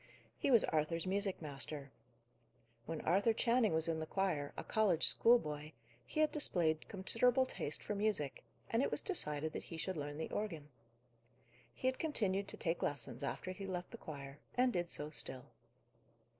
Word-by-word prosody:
He - - +1
was 235 -5 +7
Arthur's 160 +2 0
music 195 -1 0
master. 140 -1 -2 1.0
When 165 -1 -3
Arthur 200 +7 +3
Channing 235 -1 +3
was 160 0 +2
in 165 -1 0
the 160 - -4
choir, 170 -8 0
a - - -3
college 200 -7 +3
schoolboy, 155 -10 +3 0.3
he 310 - 0
had 310 - +4
displayed 165 - +1
considerable 235 +6 +3
taste 150 - -3
for 210 - -2
music; 200 -9 0 0.3
and 230 - +3
it - - +2
was - - 0
decided 155 - -1
that - - -3
he 165 - -6
should 185 +2 -3
learn 145 0 -4
the 160 - -4
organ. 165 -9 -3 1.0
He 255 - -3
had 260 - 0
continued 200 -11 0
to - - -1
take 170 0 -1
lessons 140 -2 -2
after 185 +6 -3
he 195 +1 -6
left 180 -1 -4
the - - -7
choir, 140 -2 -8 0.2
and 250 0 +4
did 175 -1 -1
so 150 -2 0
still. 130 -4 -4
175 Hz, 170 wpm, -37 LUFS, 150-215 Hz, 1.0 s, was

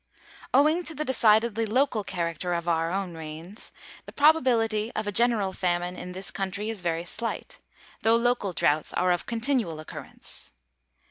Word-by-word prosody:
Owing 305 +6 +4
to 325 - -3
the 305 - -1
decidedly 225 -3 +3
local 245 -1 +2
character 175 -1 -2
of 170 0 -3
our 165 -1 +1
own 190 -1 -2
rains, 160 +5 -7 0.4
the - - -8
probability 235 -8 +3
of 215 - -1
a 205 - -1
general 220 -3 +2
famine 175 0 -1
in 180 0 -7
this 190 +1 -4
country 200 +3 -3
is 215 -4 -3
very 170 -1 -1
slight, 235 - -4 0.4
though 225 +1 +4
local 235 -4 +1
droughts 155 -3 +1
are 180 0 +2
of 175 - -1
continual 230 - 0
occurrence. 155 - -8
205 Hz, 155 wpm, -27 LUFS, 175-235 Hz, 0.4 s, Owing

